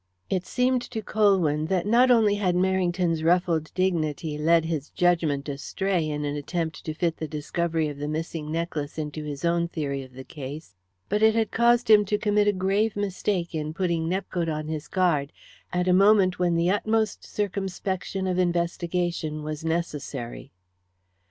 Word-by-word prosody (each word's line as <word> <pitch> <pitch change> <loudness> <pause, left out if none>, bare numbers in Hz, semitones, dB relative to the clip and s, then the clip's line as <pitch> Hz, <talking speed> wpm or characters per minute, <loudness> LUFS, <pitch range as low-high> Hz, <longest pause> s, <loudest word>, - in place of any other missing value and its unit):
It 185 -1 -1
seemed 250 0 +1
to 220 -2 -4
Colwyn 180 -9 +2
that 185 0 0
not 240 +4 +4
only 225 -4 +5
had 195 -4 0
Merrington's 180 -2 +1
ruffled 170 -2 +2
dignity 160 -4 0
led 165 +2 +3
his 160 -3 -3
judgment 165 -6 +1
astray 165 +4 -1
in 150 0 -2
an 145 0 -2
attempt 160 +2 -3
to 155 - -4
fit 165 0 -1
the 160 - -4
discovery 160 +2 -1
of 145 -1 -6
the 145 - -3
missing 155 0 -4
necklace 160 -3 -3
into 155 0 -4
his 145 0 -5
own 170 0 +2
theory 140 -5 -3
of 130 -1 -12
the 130 +1 -9
case, 145 -2 -8 0.3
but 210 +2 0
it 220 0 +5
had 225 -1 +1
caused 240 +1 +3
him 215 -1 +7
to 210 +1 0
commit 210 0 +2
a - - +6
grave 200 +3 0
mistake 195 -3 -2
in 155 0 -3
putting 170 -3 0
Nepcote 180 -2 -2
on 155 -1 -3
his 155 -1 -4
guard 165 -7 +1 0.4
at 180 0 0
a 180 - +4
moment 195 -1 +5
when 175 -1 +2
the 170 +2 +2
utmost 220 +1 0
circumspection 190 -1 -3
of 185 -1 0
investigation 170 -2 -1
was 155 +1 -5
necessary. 150 -7 -4
170 Hz, 170 wpm, -26 LUFS, 155-190 Hz, 0.4 s, him